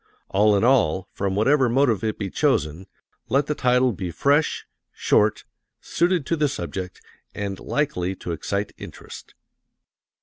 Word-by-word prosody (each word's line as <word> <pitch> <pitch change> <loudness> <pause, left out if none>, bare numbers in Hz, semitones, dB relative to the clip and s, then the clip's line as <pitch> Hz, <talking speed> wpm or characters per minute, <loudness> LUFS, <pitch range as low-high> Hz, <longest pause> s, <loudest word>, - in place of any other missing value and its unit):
All 105 +1 +3
in 100 - 0
all, 95 -8 +2
from 95 -1 -2
whatever 130 +4 +3
motive 120 -4 +2
it 110 -1 -1
be 100 -3 -4
chosen, 80 +5 0 0.4
let 140 +1 +2
the 150 - -1
title 125 -2 +2
be 90 -1 -5
fresh, 145 - +1 0.3
short, 105 0 +1 0.4
suited 175 -2 0
to 165 - 0
the 150 -2 +1
subject, 90 -5 -5 0.4
and 100 -2 -4
likely 95 -11 -2
to 90 - -6
excite 100 +5 -3
interest. - - -11
105 Hz, 140 wpm, -23 LUFS, 95-135 Hz, 0.4 s, All